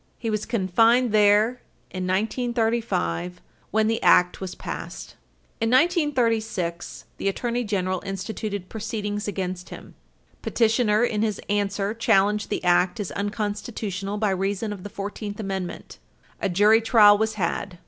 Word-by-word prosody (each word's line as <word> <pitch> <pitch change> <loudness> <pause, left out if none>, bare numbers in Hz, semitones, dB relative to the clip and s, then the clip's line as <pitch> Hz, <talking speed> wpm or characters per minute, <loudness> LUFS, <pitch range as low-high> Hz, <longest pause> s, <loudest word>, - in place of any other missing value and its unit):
He 225 - -3
was 215 0 -2
confined 230 +4 +3
there 215 +3 +4 0.3
in 185 -1 -4
1935 220 - -1 0.3
when 220 +1 +2
the 225 +1 0
Act 180 +1 +4
was 185 -1 -5
passed. - - -7 0.5
In 225 -1 0
1936, 235 - 0
the - - -3
Attorney 240 +4 -1
General 185 -4 -1
instituted 200 0 -5
proceedings 210 -1 -4
against 185 -3 -4
him. - - -11 0.5
Petitioner, 225 -1 +2
in 215 -3 0
his 215 -2 -1
answer, 200 0 0
challenged 210 -2 +2
the - - -2
Act 180 +4 +2
as 205 - -4
unconstitutional 205 -1 -3
by 210 -1 +1
reason 195 +3 -2
of 200 - -9
the 205 - -7
Fourteenth 205 +1 -6
Amendment. 195 -3 -5 0.4
A 200 - 0
jury 210 +5 +5
trial 215 -3 +6
was 220 0 0
had. 180 -1 -3
210 Hz, 135 wpm, -24 LUFS, 195-225 Hz, 0.5 s, trial